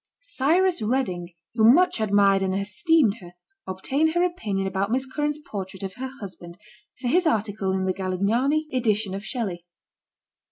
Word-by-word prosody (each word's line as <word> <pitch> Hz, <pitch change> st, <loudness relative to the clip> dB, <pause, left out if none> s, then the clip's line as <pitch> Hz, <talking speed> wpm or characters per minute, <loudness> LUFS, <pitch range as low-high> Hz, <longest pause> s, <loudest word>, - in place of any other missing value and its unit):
Cyrus 360 Hz, -, +1 dB
Redding, 210 Hz, -7 st, -1 dB, 0.2 s
who 225 Hz, -2 st, +1 dB
much 350 Hz, -4 st, +3 dB
admired 200 Hz, -2 st, +3 dB
and 190 Hz, 0 st, 0 dB
esteemed 220 Hz, -, +2 dB
her, 175 Hz, -1 st, -12 dB, 0.3 s
ob 190 Hz, 0 st, -7 dB
tained 315 Hz, +4 st, +1 dB
her 345 Hz, -, +3 dB
opinion 210 Hz, -, -2 dB
about 190 Hz, +1 st, -1 dB
Miss 260 Hz, +3 st, 0 dB
Currants 295 Hz, +3 st, -2 dB
portrait 190 Hz, -2 st, -6 dB
of 190 Hz, -1 st, -5 dB
her 260 Hz, +1 st, -6 dB
husband, 180 Hz, -4 st, -9 dB, 0.4 s
for 255 Hz, -, -3 dB
his 345 Hz, +7 st, +3 dB
article 205 Hz, -7 st, 0 dB
in 190 Hz, 0 st, -1 dB
the 185 Hz, -, 0 dB
Galignani 215 Hz, -, 0 dB
edition 215 Hz, -5 st, +1 dB
of 195 Hz, +1 st, -5 dB
Shelley. 205 Hz, -8 st, -4 dB
215 Hz, 160 wpm, -24 LUFS, 190-275 Hz, 0.4 s, much